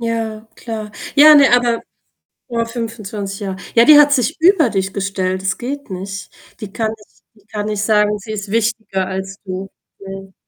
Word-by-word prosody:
Ja, 225 -1 -3
klar. 220 -2 -6 0.2
Ja, 300 +1 +9
ne, 280 -4 +6
aber 240 -1 +2 0.7
boah 230 -2 -1
25 220 -4 -5
Jahre 195 -2 -4 0.2
ja, 230 0 +6
die 300 +1 +9
hat 290 -1 +6
sich 275 +5 0
über 335 - +4
dich 190 -2 -2
gestellt, 190 -2 -2
das 190 0 -1
geht 280 +1 -6
nicht. 195 +1 -6 0.3
Die 210 -3 -7
kann 220 0 -2
nicht 210 - -23 0.2
die 210 -2 -26
kann 210 -1 -4
nicht 210 -1 -2
sagen, 210 -1 +2
sie 215 +2 -9
ist 200 -2 -6
wichtiger 220 -4 -1
als 190 0 -5
du? 190 +1 -5 0.3
Ne. 195 0 -9
215 Hz, 180 wpm, -18 LUFS, 195-235 Hz, 0.7 s, Ja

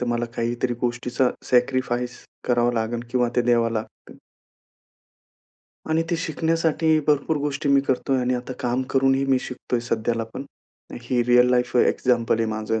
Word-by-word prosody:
तर 125 - -2
मला 120 0 0
काहीतरी 120 +1 -1
गोष्टीचं 125 +1 0 0.2
सॅक्रिफाईस 125 -1 0 0.2
करावं 120 0 +2
लागेल 115 +1 -2
किंवा 125 -1 +1
ते 120 - +4
द्यावं 120 -1 +2
लागतं. 110 -1 -7 1.7
आणि 160 +1 +2
ते 170 - +1
शिकण्यासाठी 160 -1 +1
भरपूर 150 +1 +2
गोष्टी 145 0 -2
मी 140 0 +5
करतोय. 135 0 0
आणि 125 0 0
आता 125 +1 -5
काम 125 0 0
करूनही 135 0 +2
मी 135 -1 +3
शिकतोय. 125 -1 -4
सध्याला 115 -1 -1
पण 135 - -5 0.6
हे 120 0 0
रिअल 125 0 +5
लाईफ 125 0 +1
एक्झाम्पल 120 -2 +2
आहे 115 - +1
माझं. 110 +1 -2
125 Hz, 150 wpm, -23 LUFS, 120-135 Hz, 1.7 s, मी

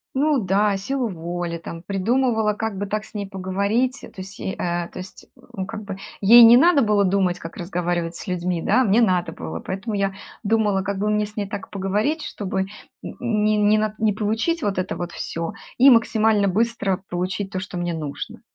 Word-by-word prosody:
Ну 290 +1 +2
да, 200 0 +2
силу 250 +6 -2
воли, 175 -2 -4
там, 165 0 -8
придумывала, 220 +3 +1
как 220 -1 -3
бы 205 - -2
так 215 +1 -3
с - - -19
ней 205 -2 -4
поговорить. 200 +7 -1
То - - -11
есть, 195 +2 -9
е 190 - -3
э, - - -19 0.3
то - - -9
есть, 185 +1 -11 0.3
ну, 190 - -3
как 210 - -7
бы, 195 - -5 0.2
ей 235 +4 +9
не 230 +1 +9
надо 320 +1 +5
было 210 -3 +3
думать, 185 -2 +1
как 165 - -9
разговаривать 175 -1 -2
с - - -9
людьми, 180 -2 -1
да, 245 +6 +3
а - - +4
мне 215 0 +3
надо 185 -5 +2
было, 80 0 -6
поэтому 200 +3 -4
я 195 -1 0 0.3
думала, 210 -2 +2
как 200 0 -3
бы 210 +1 0
мне 210 0 +1
с 210 +1 -14
ней 200 -2 -2
так 205 -1 -6
поговорить, 210 +11 -1
чтобы 195 -1 -3
н 190 - -2 0.5
не 215 -3 +1
не 210 +1 +4
на 215 0 -1
не 220 -1 +3
получить 225 - -1
вот 200 -2 -1
это 185 0 -2
вот 175 -1 -5
всё, 165 0 -4 0.2
и 265 +3 +8
максимально 220 -4 +4
быстро 205 -2 0
получить 185 +2 -2
то, 185 - -2
что 185 -1 -6
мне 175 -1 -2
нужно. 150 -3 -6
200 Hz, 205 wpm, -22 LUFS, 185-220 Hz, 0.5 s, ей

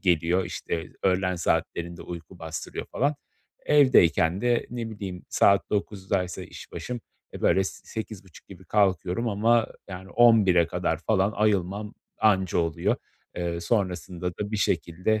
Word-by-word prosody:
geliyor. 85 +1 +2
İşte, 85 -1 -4
öğlen 95 -1 +1
saatlerinde 85 +1 -1
uyku 85 +1 -9
bastırıyor 80 0 -6
falan. 145 +3 0 0.5
Evdeyken 95 - +5
de 120 -1 +1
ne 115 -2 -4
bileyim 95 -4 -7
saat 100 0 +3
9'daysa 95 -3 -2
işbaşım, 125 -1 -7 0.3
eee, - - -7
böyle 95 - +3
s - - -6
sekiz 110 -3 -6
buçuk 95 - -17
gibi - - -12
kalkıyorum 100 +2 +1
ama, 115 +3 +3 0.2
yani, 95 0 -8
11'e 105 -8 +5
kadar 85 -2 -1
falan 100 -1 +2
ayılmam 105 0 0 0.2
anca 95 -4 +3
oluyor. 85 -2 0 0.4
Eee, 85 -1 -2
sonrasında 90 -3 -2
da 100 +4 -5
bir 110 - 0
şekilde 90 +3 0
95 Hz, 135 wpm, -26 LUFS, 90-110 Hz, 0.5 s, Evdeyken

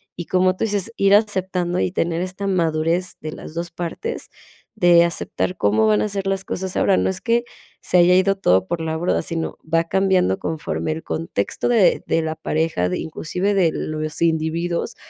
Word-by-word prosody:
y 175 - -6
como 185 +1 +2
tú - - -3
dices, 205 0 -1
ir 195 0 +4
aceptando 190 -4 +1
y - - 0
tener 170 -2 -1
esta 185 +2 -4
madurez 170 -1 0
de 155 - -5
las - - -10
2 170 +1 -4
partes 175 - -5 0.5
de 175 -4 +5
aceptar 170 +1 -2
cómo 110 - +2
van 105 -1 +3
a - - -1
ser 195 -1 -3
las 195 0 -1
cosas. 190 -1 -4
Ahora, 195 - +3
no - - +1
es 190 0 -2
que 235 0 +1 0.4
se 180 - +1
haya 180 +1 +6
ido 190 +1 +3
todo 95 - +2
por 170 - -2
la 160 0 -2
borda, 175 +2 0
sino 165 -1 -4
va 165 0 +3
cambiando 185 - +1
conforme 155 0 -3
el 160 - -7
contexto 160 -11 -2
de 225 -6 +4
de 165 - +1
la 160 0 -2
pareja, 155 - -1
de 90 - -2
inclusive 180 +5 -2
de 180 -5 +3
los 155 0 -3
individuos 165 +4 -1
175 Hz, 190 wpm, -21 LUFS, 160-190 Hz, 0.5 s, haya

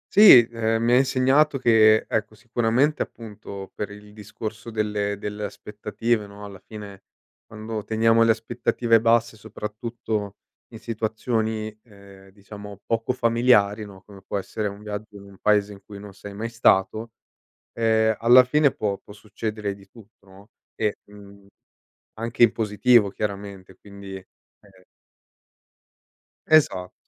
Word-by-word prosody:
Sì, 160 - +9
ehm, 115 0 -1
mi 120 - +2
ha 125 - +6
insegnato 135 +3 +3
che 110 -3 +4
ecco 110 0 -2
sicuramente 125 +4 0
appunto 100 -3 -8
per 105 - -5
il 105 0 -13
discorso 110 +2 -8
delle 105 -2 -2
delle 105 0 -6
aspettative, 105 +2 -3
no, 100 0 -11
alla 100 -2 -11
fine 105 -3 -11 0.5
quando 110 0 -6
teniamo 115 +1 +2
le 115 - +4
aspettative 115 0 +1
basse 115 -1 +2
soprattutto 105 0 -5 0.3
in - - -12
situazioni, 110 -1 -3
ehm, 100 -3 -17
diciamo, 100 0 -12
poco 115 +1 -1
familiari, 115 -4 +2
no, 95 -2 -14
come 100 -1 -15
può 100 - -4
essere 105 +2 -4
un 100 +1 -8
viaggio 105 0 -7
in 100 - -11
un 100 -1 -16
paese 105 -1 +2
in 100 - -15
cui 100 - -11
non 100 -1 -11
sei 100 +1 -11
mai 115 +3 -4
stato, 110 0 +1 0.6
ehm, 110 -1 +2
alla 125 +2 +7
fine 145 +2 +2
può 100 -2 -2
può 105 - -15
succedere 105 0 -5
di 100 -1 -17
tutto, 110 -1 -19
no, 95 +2 -17 0.3
e, 105 -2 -1
mhmm, 100 -1 -16 0.7
anche 115 +1 0
in 115 - +6
positivo 110 +1 +3
chiaramente, 100 -2 -6
quindi, 100 -1 -11
ehm 95 0 -22 1.6
Esatto, 95 -13 +3
105 Hz, 140 wpm, -23 LUFS, 100-115 Hz, 1.6 s, Sì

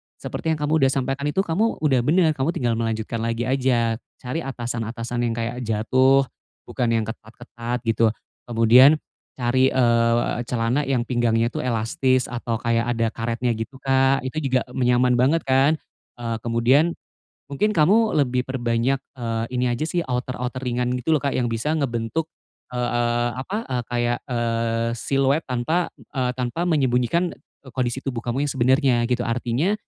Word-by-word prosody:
seperti 160 -1 -3
yang - - -10
kamu 150 - -1
udah 135 - +4
sampaikan 135 +2 -1
itu 190 +6 +1
kamu 205 +7 0
udah 135 -5 +3
bener, 160 +5 +3
kamu 150 +3 -1
tinggal 115 -2 0
melanjutkan 115 0 -2
lagi 115 +1 -1
aja. 125 -3 +1 0.2
Cari 125 +6 -3
atasan-atasan 120 -3 -4
yang 115 - -2
kayak 120 +2 -3
jatuh, 130 +5 +3 0.4
bukan 120 - -2
yang 110 - +1
ketat-ketat 120 +2 -6
gitu. 115 0 +2 0.4
Kemudian, 120 +5 +6 0.4
cari, 130 +1 +2
eee, 120 -2 +2
celana 125 +4 0
yang 125 -3 +1
pinggangnya 120 -1 +1
itu - - -4
elastis 125 +2 0
atau 120 -1 -2
kayak 115 +1 0
ada 115 0 +1
karetnya 115 +2 -2
gitu 115 +5 -6
Kak 135 0 +3
itu 130 +4 -5
juga 130 -1 +2
me 125 -1 -1
nyaman 125 0 +3
banget 145 +6 +3
kan, 135 +3 +3 0.4
eee, 115 -2 -3
kemudian, 120 +8 +2 0.6
mungkin 210 +9 +1
kamu 205 +8 +4
lebih 125 0 -1
perbanyak, 120 0 0 0.2
eee, 115 -1 -2
ini 125 0 0
aja 120 +4 -1
sih 175 - 0
outer-outer 125 0 -3
ringan 125 0 -1
gitu 125 +5 -1
loh 155 - +4
Kak 140 0 -1
yang 120 -2 0
bisa 130 +8 -1
ngebentuk, 140 +2 -2 0.4
eee 125 - -5 0.2
eee, 120 0 +1
apa, 135 +11 -4
eee, 125 -2 -2
kayak, 120 0 0
eee, 115 -1 0
siluet 135 +5 +1
tanpa, 135 +8 -1 0.3
eee, 125 -2 +1
tanpa 125 +7 -2
menyembunyikan 135 +4 +1
e 140 - -23
kondisi 125 -1 -1
tubuh 125 -4 -3
kamu 130 +4 -1
yang 145 - -1
sebenernya 130 0 +3
gitu 125 -1 0
artinya, 125 - 0
125 Hz, 160 wpm, -23 LUFS, 115-135 Hz, 0.6 s, Kemudian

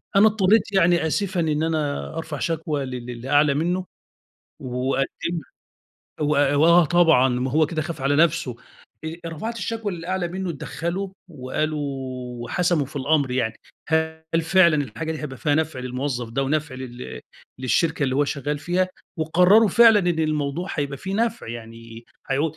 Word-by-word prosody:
أنا 200 +2 +7
اضطريت 210 0 +2
يعني 175 -3 +3
آسفًا 185 +3 -1
إن 155 -2 +1
أنا 155 -3 -2
أرفع 160 -3 -5
شكوى 155 -4 -2
ل - - -7
للي 125 0 -7
أعلى 145 0 +4
منه 175 +5 -1 0.8
وأقدمها، 135 +5 -2 0.7
و 150 - +1 0.3
وآه 170 +3 +6
طبعًا 160 -6 +4
ما 125 +1 -1
هو 155 +3 +3
كده 155 0 -2
خاف 160 -1 -6
على 140 +2 +1
نَفسه، 155 -6 +2 0.5
آآ، 160 +1 -4
رفعت 170 +9 -5
الشكوى 225 -3 -3
للي 165 -1 -7
أعلى 185 -2 -1
منه، 185 +1 -4
اتدخلوا 170 +5 -4 0.2
وقالوا 150 +1 -3 0.6
وحسموا 175 -1 +1
في 145 - -12
الأمر 140 0 +1
يعني، 120 -3 0 0.3
هل 160 0 0 0.2
فعلًا 170 -1 +5
الحاجة 135 +7 -5
دي 155 - -5
هيبقى 135 -3 -5
فيها 145 +2 +1
نفع 155 -3 -1
للموظف 125 -1 -3
ده 135 +4 -1
ونفع 145 0 -1
لل 120 - -8 0.4
للشركة 150 +5 +1
اللي 130 -2 +1
هو 145 - +3
شغال 145 +1 -3
فيها، 180 +4 0 0.3
وقرروا 180 +7 +5
فعلًا 225 +2 +7
إن 175 -3 0
الموضوع 155 +2 -1
هيبقى 140 -2 -2
فيه 190 +1 -4
نفع 230 - -1
يعني 115 0 -9 0.3
هيعود 145 +3 0
155 Hz, 155 wpm, -23 LUFS, 135-175 Hz, 0.8 s, أنا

